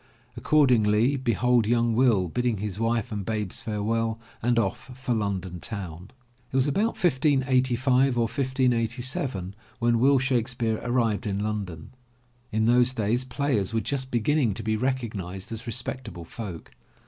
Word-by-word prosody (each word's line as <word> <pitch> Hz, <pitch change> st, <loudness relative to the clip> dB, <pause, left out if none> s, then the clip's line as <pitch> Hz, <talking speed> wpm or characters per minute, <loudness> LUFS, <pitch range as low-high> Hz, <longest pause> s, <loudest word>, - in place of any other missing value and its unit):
Accordingly, 125 Hz, -4 st, +3 dB
behold 125 Hz, -2 st, +2 dB
young 115 Hz, 0 st, +2 dB
Will, 110 Hz, -6 st, +3 dB
bidding 120 Hz, +4 st, -1 dB
his 100 Hz, 0 st, -4 dB
wife 115 Hz, -1 st, 0 dB
and 105 Hz, -2 st, -3 dB
babes 105 Hz, -2 st, -3 dB
farewell 110 Hz, +1 st, -1 dB, 0.2 s
and 120 Hz, +1 st, +1 dB
off 105 Hz, +2 st, -1 dB
for 130 Hz, -1 st, -1 dB
London 95 Hz, -5 st, -2 dB
town. 90 Hz, -2 st, -7 dB, 0.4 s
It -, -, -6 dB
was 135 Hz, -1 st, +3 dB
about 205 Hz, +11 st, 0 dB
1585 130 Hz, -3 st, +2 dB
or -, -, +3 dB
1587 120 Hz, -4 st, 0 dB, 0.2 s
when 120 Hz, 0 st, +2 dB
Will 135 Hz, +3 st, +5 dB
Shakespeare 120 Hz, -3 st, 0 dB
arrived 115 Hz, -5 st, 0 dB
in 100 Hz, -1 st, -1 dB
London. 100 Hz, -6 st, -4 dB, 0.6 s
In 110 Hz, +1 st, +1 dB
those 125 Hz, +2 st, +4 dB
days 115 Hz, +4 st, 0 dB
players 125 Hz, -6 st, -1 dB
were -, -, +3 dB
just 130 Hz, +4 st, -2 dB
beginning 120 Hz, -1 st, +1 dB
to 110 Hz, -, -4 dB
be 110 Hz, +1 st, 0 dB
recog 125 Hz, -1 st, -1 dB
nized 95 Hz, 0 st, -6 dB
as 115 Hz, +1 st, -6 dB
respectable 115 Hz, -7 st, -5 dB
folk. 90 Hz, -3 st, -8 dB
115 Hz, 145 wpm, -26 LUFS, 105-130 Hz, 0.6 s, Will